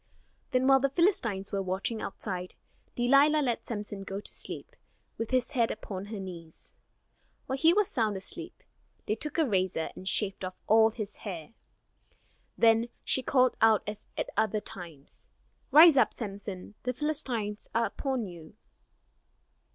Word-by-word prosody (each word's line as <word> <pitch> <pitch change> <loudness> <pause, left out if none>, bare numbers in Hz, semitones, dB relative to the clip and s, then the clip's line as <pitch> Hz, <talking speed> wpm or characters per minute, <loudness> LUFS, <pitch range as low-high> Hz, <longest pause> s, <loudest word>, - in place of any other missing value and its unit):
Then 255 0 +1
while 270 0 +6
the 275 +1 +1
Philistines 255 - +1
were 200 - -1
watching 195 +4 -2
outside, 185 -2 -5 0.4
Delilah 280 +5 +4
let 240 -3 -2
Samson 205 -3 -5
go 195 0 -5
to - - -7
sleep, - - -7 0.4
with 225 - -2
his 255 -1 +1
head 235 -5 +2
upon 195 -2 -6
her 210 0 -6
knees. 170 -4 -10 0.7
While 265 +1 -3
he 325 +3 +6
was 410 +2 +3
sound 220 - 0
asleep, 190 - -7 0.4
they - - 0
took 290 +8 -4
a 320 - +4
razor 185 - 0
and 190 - -4
shaved 195 -2 0
off 185 0 -4
all 220 +1 +6
his 215 -2 -6
hair. 180 -1 -7 1.0
Then 230 +1 +4
she 260 - +2
called 255 -1 +3
out 220 -2 +5
as 210 0 -7
at - - -2
other 215 0 +1
times. 165 - -11 0.4
"Rise 310 +1 +8
up, - - +4
Samson, 200 -3 -6
the 250 - -2
Philistines 245 -8 -1
are 230 0 +3
upon 260 -1 -2
you." 170 -2 -11
220 Hz, 150 wpm, -29 LUFS, 195-260 Hz, 1.0 s, Rise